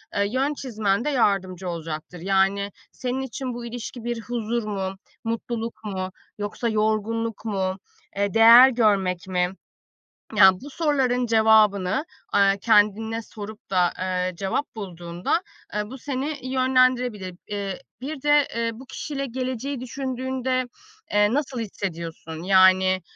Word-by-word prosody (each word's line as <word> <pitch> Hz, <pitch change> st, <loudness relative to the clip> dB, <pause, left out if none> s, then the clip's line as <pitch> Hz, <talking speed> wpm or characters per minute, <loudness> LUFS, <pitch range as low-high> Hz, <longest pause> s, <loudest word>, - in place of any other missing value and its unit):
eee, 200 Hz, -, +2 dB
yön 270 Hz, +5 st, 0 dB
çizmende 220 Hz, -1 st, -1 dB
yardımcı 190 Hz, -8 st, +1 dB
olacaktır. 165 Hz, 0 st, -6 dB
Yani 195 Hz, +2 st, +1 dB, 0.2 s
senin 255 Hz, +1 st, -3 dB
için 260 Hz, -1 st, -4 dB
bu 240 Hz, 0 st, -6 dB
ilişki 240 Hz, 0 st, -7 dB
bir 240 Hz, -1 st, -3 dB
huzur 235 Hz, 0 st, -2 dB
mu, 195 Hz, -2 st, -3 dB, 0.3 s
mutluluk 230 Hz, 0 st, -4 dB
mu 190 Hz, -2 st, -3 dB, 0.3 s
yoksa 210 Hz, +3 st, -2 dB
yorgunluk 220 Hz, +1 st, -1 dB
mu? 190 Hz, -3 st, -1 dB, 0.4 s
Eee, 200 Hz, 0 st, 0 dB
değer 230 Hz, +3 st, +9 dB
görmek 195 Hz, -7 st, +1 dB
mi? 180 Hz, -1 st, +1 dB, 0.9 s
Yani 190 Hz, -2 st, +7 dB
bu 285 Hz, -, -8 dB
soruların 265 Hz, -6 st, +1 dB
cevabını, 220 Hz, 0 st, +4 dB, 0.3 s
aaa, 195 Hz, 0 st, +4 dB
kendine 220 Hz, +2 st, +2 dB
sorup 210 Hz, -1 st, -10 dB
da, 180 Hz, -2 st, +3 dB
ııı, 185 Hz, -1 st, -1 dB
cevap 200 Hz, +8 st, -2 dB
bulduğunda, 175 Hz, -, -2 dB, 0.3 s
eee, 210 Hz, +1 st, -2 dB
bu 265 Hz, -, -8 dB
seni 275 Hz, +1 st, -4 dB
yönlendirebilir. 255 Hz, -7 st, +2 dB
Iıı, 200 Hz, -2 st, -3 dB, 0.2 s
bir 275 Hz, +1 st, -6 dB
de, 295 Hz, -1 st, +4 dB
ııı, 230 Hz, 0 st, 0 dB
bu 265 Hz, -, -11 dB
kişiyle 275 Hz, +1 st, -4 dB
geleceği 255 Hz, +1 st, -3 dB
düşündüğünde, 260 Hz, 0 st, -2 dB, 0.5 s
eee, 205 Hz, +1 st, +4 dB
nasıl 275 Hz, -4 st, -1 dB
hissediyorsun? 170 Hz, -6 st, -5 dB
Yani, 185 Hz, 0 st, +5 dB
220 Hz, 125 wpm, -24 LUFS, 195-255 Hz, 0.9 s, değer